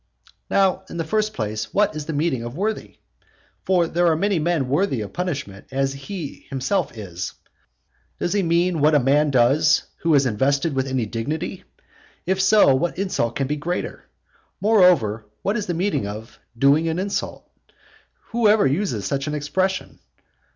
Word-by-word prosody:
Now, 190 -1 +2
in - - -7
the 165 - -1
first 215 +6 0
place, 110 - -4
what 205 -5 +2
is 150 -1 -5
the - - -2
meaning 145 -4 0
of 120 +5 -7
"worthy?" 215 +3 -3 0.7
For 180 -2 +3
there 175 +1 +1
are 165 - +4
many 195 +1 +1
men 160 -4 0
worthy 140 - +1
of 105 - -7
punishment, 140 - -4
as 135 0 -1
he 145 +3 -7
himself 135 - -1
is. 90 -4 -6 0.8
Does 175 - -1
he 205 - +2
mean 170 0 +1
what 150 +1 +4
a - - +6
man 145 +3 +3
does 140 +4 +4
who 165 -2 +2
is 140 -1 +4
invested 140 +6 +1
with 135 0 -1
any 130 -3 -1
dignity? 150 - -4 0.6
if 190 +1 +1
so, 195 -7 +5
what 170 +7 -1
insult 185 -12 -1
can 135 - 0
be 150 +3 -2
greater? 175 +5 -4 0.5
Moreover, 180 - +3 0.2
what 200 - 0
is 210 -3 -2
the 175 - -1
meaning 180 - 0
of 110 +3 -8 0.2
"doing 140 +5 +4
an 160 - -2
insult?" 195 +2 -3 0.8
Who 230 -1 +2
ever 210 0 +5
uses 135 - 0
such 140 +1 -2
an 150 - -2
expression? 185 +6 -2
155 Hz, 170 wpm, -22 LUFS, 130-185 Hz, 0.8 s, a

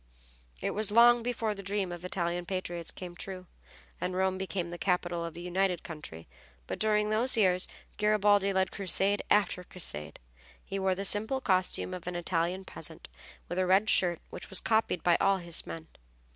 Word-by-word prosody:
It - - -1
was 215 0 -1
long 235 +2 +6
before 230 -2 -1
the 200 - -8
dream 200 -1 -2
of 175 0 -7
Italian 175 -1 -2
patriots 175 -3 -3
came 180 -2 -6
true 185 +1 -6 0.6
and 180 0 -2
Rome 190 0 +1
became 185 -2 -3
the 175 - -7
capital 175 -2 0
of 165 0 -6
a - - -6
united 180 +1 0
country, 150 - -8 0.4
but - - -5
during 210 0 +2
those 235 +4 +4
years 185 -3 +3 0.3
Garibaldi 205 -1 +3
led 190 -1 +1
crusade 195 +1 +2
after 200 -3 +2
crusade. 75 - -3 0.5
He 195 - -4
wore 190 -1 +1
the 195 +2 -4
simple 220 +7 +3
costume 185 -4 0
of 180 -1 -7
an 180 - -3
Italian 175 +2 -1
peasant, 160 -1 -10 0.4
with 175 +2 -3
a 185 - +1
red 195 +4 +4
shirt 175 -2 +3
which - - -8
was - - +2
copied 220 -6 +1
by 175 -1 +4
all 195 0 +3
his 170 -2 0
men. 165 -1 -7
185 Hz, 180 wpm, -30 LUFS, 175-205 Hz, 0.6 s, long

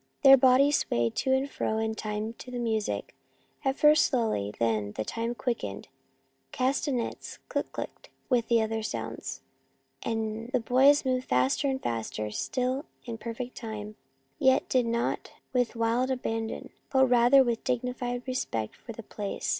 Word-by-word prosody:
Their 270 -1 +10
bodies 270 +2 +5
swayed 120 -1 0
to 265 - +1
and 265 +1 +2
fro 220 -5 -2
in 220 0 0
time 215 +1 -3
to - - -9
the 250 - -5
music, 220 -3 -2 0.5
at 270 -1 +1
first 300 0 +6
slowly, 220 - 0
then, 110 -3 +1
as 100 - -9
the 110 - -2
time 230 +1 -3
quickened, 135 - -3 0.6
castanets 260 -1 -1
click - - -2
clicked - - -7 0.2
with 240 -3 +2
the 230 -2 +4
other 220 0 -2
sounds, 215 - -5 0.6
and 225 0 -3
the 255 - +3
boys 265 +5 +4
moved 255 -1 0
faster 130 - +2
and 265 -1 0
faster, 110 -2 -3
still 255 - -1 0.2
in 230 -3 -6
perfect 240 +2 -5
time, 215 -2 -6 0.4
yet 260 0 +3
not 235 -2 0 0.2
with 245 -2 +1
wild 230 +3 +1
abandon, 225 -3 -3 0.2
but 265 -1 +5
rather 250 +2 +6
with 235 -2 -1
dignified 250 0 -2
respect 115 - -2
for 230 - -10
the 225 - -9
place. 205 -1 -4
235 Hz, 155 wpm, -28 LUFS, 220-255 Hz, 0.6 s, Their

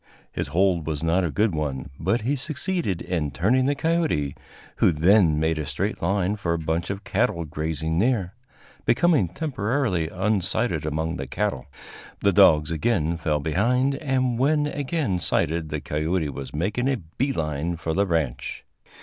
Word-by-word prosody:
His - - -3
hold 90 -2 +1
was 80 -1 -2
not 85 +3 +2
a 85 - 0
good 105 +4 +1
one, 70 -5 -3
but 115 - +1
he 130 +6 0
succeeded 150 - -2
in 85 -5 -1
turning 110 - +2
the 145 - +2
coyote, 160 - 0 0.4
who - - +4
then 85 0 +4
made 80 0 +1
a 75 - -2
straight - - -2
line 95 +3 0
for 85 -5 -1
a - - -1
bunch 80 +1 -2
of 100 +1 -4
cattle 85 -3 0
grazing 80 +1 -2
near, 105 -5 +1 0.5
becoming 165 - +3
temporarily 115 - -1
unsighted 95 -3 0
among 80 +2 -2
the 65 - -5
cattle. 95 -3 -2 0.5
The 100 -1 +3
dogs 75 -2 +5
again 85 -1 +1
fell 75 -3 0
behind, 120 - +1
and 130 -5 0
when 150 +3 +3
again 145 - -1
sighted 80 -1 0
the 75 0 -2
coyote 75 +3 -1
was 70 -1 -7
making 100 - -1
a 135 -1 +1 0.2
bee 135 +2 +2
line 80 - -2
for 80 -1 -3
the 100 +4 +1
ranch. 80 -8 -2
90 Hz, 165 wpm, -24 LUFS, 80-120 Hz, 0.5 s, dogs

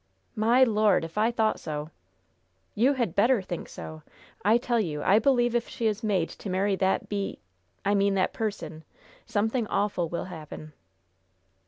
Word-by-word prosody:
"My 235 +4 +4
Lord, 215 -7 +3
if 165 - -10
I 215 +2 +3
thought 225 -2 0
so!" 150 +1 -5 0.8
"You 250 +7 +3
had 240 -10 -1
better 235 +4 +4
think 185 -3 -6
so. 155 0 -8 0.4
I 215 +4 +5
tell 240 -1 0
you 155 -8 -2
I 200 +3 +5
believe 240 -1 +2
if 240 -1 -1
she 230 - -4
is 215 -1 0
made 195 -7 0
to 200 - -8
marry 195 +2 +1
that 190 0 +1
beat 200 -1 -3 0.5
I 200 - +3
mean 200 -1 +2
that 185 - +1
person 165 -8 -4 0.4
something 220 +2 0
awful 200 -5 0
will 170 - -3
happen." 155 -3 -9
205 Hz, 165 wpm, -27 LUFS, 180-225 Hz, 0.8 s, I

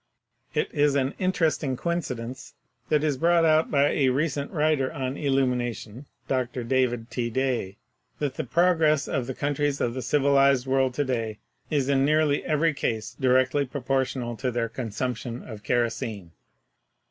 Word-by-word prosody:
It - - -1
is 145 -1 +2
an 135 0 +1
interesting; 160 -8 0
coincidence 130 -8 -4 0.3
that 150 -1 +2
is 150 -3 +1
brought 170 +2 +3
out 155 0 +3
by 140 0 +3
a 135 -3 +2
recent 140 +1 -1
writer 150 -3 +1
on 135 -3 -3
illumination, 125 -3 -1 0.2
Dr. 125 -2 -1
David 120 -1 0
T. 120 -2 -2
Day, 120 -6 -1 0.4
that 145 -3 -2
the - - -3
progress 155 0 +2
of 125 -3 -2
the 130 - -4
countries 145 0 -1
of 120 - 0
the 130 - -4
civilized 140 0 +3
world 130 -1 +1
to 145 - 0
day 115 -4 -2 0.3
is 140 -4 0
in 135 -1 +3
nearly 150 0 +2
every 155 0 +1
case 110 -5 -3
directly 130 +2 +3
proportional 130 -2 -2
to 130 +2 -1
their 115 -2 -1
consumption 120 +1 -4
of 110 -3 -8
kero 120 +2 +1
sene. 110 -8 -6
130 Hz, 155 wpm, -26 LUFS, 125-145 Hz, 0.4 s, brought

